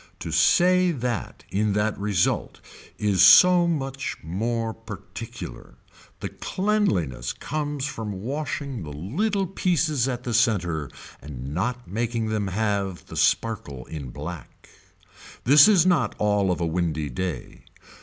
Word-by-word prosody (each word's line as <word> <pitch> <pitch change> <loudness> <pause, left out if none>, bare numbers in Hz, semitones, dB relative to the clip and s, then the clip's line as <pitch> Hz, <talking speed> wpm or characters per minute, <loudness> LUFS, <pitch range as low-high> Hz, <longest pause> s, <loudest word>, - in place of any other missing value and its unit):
To 85 - -5
say 180 - +4
that 125 -7 -3
in 105 +1 +1
that 105 +1 0
result 100 -3 0 0.4
is 100 -3 +1
so 175 - +8
much 135 -5 -3
more 115 +6 -2
particular. 110 - -9 0.5
The - - -3
cleanliness 100 - -1
comes 145 -1 -3
from 110 -7 -4
washing 140 -2 -4
the 80 - -7
little 190 - -1
pieces 160 -8 0
at 125 -1 -3
the 120 - -3
center 90 - +1 0.3
and 70 -1 -7
not 120 +8 -2
making 115 +2 -2
them 105 -2 -1
have 100 -2 -2
the - - -10
sparkle 70 - 0
in 75 -5 -7
black. 75 +6 -9 0.8
This 140 +4 +8
is 190 -6 +5
not 180 -5 +2
all 105 -2 +1
of 90 - 0
a 85 - 0
windy 80 -4 -1
day. 80 0 -5
110 Hz, 130 wpm, -24 LUFS, 90-140 Hz, 0.8 s, so